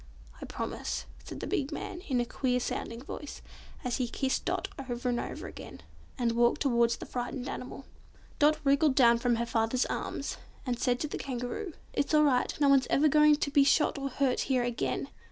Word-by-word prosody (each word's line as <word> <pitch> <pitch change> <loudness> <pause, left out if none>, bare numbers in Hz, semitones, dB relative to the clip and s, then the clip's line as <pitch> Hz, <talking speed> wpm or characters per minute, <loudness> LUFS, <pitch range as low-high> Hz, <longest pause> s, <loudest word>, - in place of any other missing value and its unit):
"I - - -5
promise," - - -4 0.2
said - - -8
the - - -3
big 280 +1 -1
man, 355 +3 -5
in 255 -3 +1
a 240 - +1
queer 250 +1 0
sounding 235 0 -4
voice, 290 +1 -8 0.4
as 250 -2 -1
he 255 -2 0
kissed 265 +2 -1
Dot - - -1 0.2
over 245 +1 -2
and 240 -1 0
over - - -5
again, - - -9 0.4
and 235 -2 +1
walked 235 +1 +2
towards 235 -3 +3
the - - -7
frightened 245 +1 -4
animal. 265 0 -6 0.5
Dot 305 +1 +5
wriggled 280 0 +3
down 235 -3 +6
from 240 0 +2
her 235 +1 -1
father's 230 +2 +1
arms, - - -4 0.3
and 245 -2 -2
said 245 -2 +1
to 300 - -1
the - - -5
Kangaroo, 270 - -4 0.2
"It's 285 +2 +1
all 300 - +6
right; 255 -4 +3
no 285 - +4
one's 275 -2 +5
ever 300 +2 +4
going 300 0 +6
to 290 -1 -2
be 285 0 +6
shot 285 +1 +3
or 275 0 -2
hurt 260 0 +1
here 255 -2 +2
again!" 240 -1 -2
260 Hz, 200 wpm, -30 LUFS, 245-285 Hz, 0.5 s, down